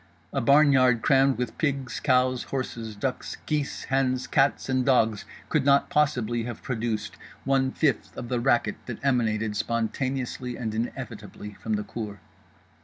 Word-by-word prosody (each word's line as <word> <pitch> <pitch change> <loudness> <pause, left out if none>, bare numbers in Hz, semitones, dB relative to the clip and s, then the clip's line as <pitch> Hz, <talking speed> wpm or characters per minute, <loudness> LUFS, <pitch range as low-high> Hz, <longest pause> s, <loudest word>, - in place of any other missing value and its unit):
A - - 0
barnyard 135 -3 +5
crammed 135 -1 +4
with 125 0 -4
pigs, 135 -6 -1
cows, 130 -2 +2
horses, 115 -5 -4
ducks, 125 +5 -3
geese, 150 -2 -2
hens, 130 -1 0
cats 140 -1 +2
and 130 -1 +1
dogs 115 -5 +2 0.2
could - - +1
not 140 0 +3
possibly 125 -6 +1
have 120 -2 -7
produced 110 -4 -3 0.3
one 135 -1 +2
fifth 135 -4 -1
of 120 - -5
the 125 0 -1
racket 120 -1 +2
that 120 - -4
emanated, 110 -5 +1
spontaneously 125 +3 -2
and 110 -3 -3
inevitably, 110 -2 -5
from 110 +2 -4
the 105 0 0
cour. 105 -3 -6
125 Hz, 145 wpm, -26 LUFS, 115-135 Hz, 0.3 s, barnyard